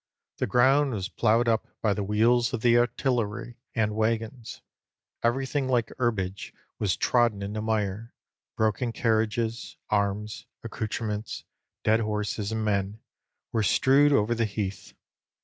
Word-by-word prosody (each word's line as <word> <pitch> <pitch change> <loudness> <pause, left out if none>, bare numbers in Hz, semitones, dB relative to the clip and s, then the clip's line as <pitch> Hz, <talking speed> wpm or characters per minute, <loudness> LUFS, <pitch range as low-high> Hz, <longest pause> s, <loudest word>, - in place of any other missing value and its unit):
The - - 0
ground 135 +4 +4
was 95 -4 -3
ploughed 115 +1 +2
up 115 -1 +1
by 105 -2 +2
the 105 - -2
wheels 120 +5 +2
of 120 - -2
the 120 0 +4
artillery 120 -1 0 0.2
and 105 -2 +1
waggons; 115 +1 -2 0.6
everything 135 +3 0
like 120 -3 +1
herbage 100 -6 -2 0.2
was 100 -4 0
trodden 120 -5 +2
into 105 +2 -4
mire; 110 0 -2 0.5
broken 110 +2 0
carriages, 115 0 -1
arms, 105 +1 -1 0.2
accoutrements, 110 -1 -4 0.4
dead 110 +1 +3
horses 105 -1 -2
and 110 -1 -1
men, 100 0 -1 0.5
were 110 - +1
strewed 135 +7 +4
over 120 -4 +3
the 115 -1 0
heath. 100 -3 -5
110 Hz, 130 wpm, -27 LUFS, 105-120 Hz, 0.6 s, ground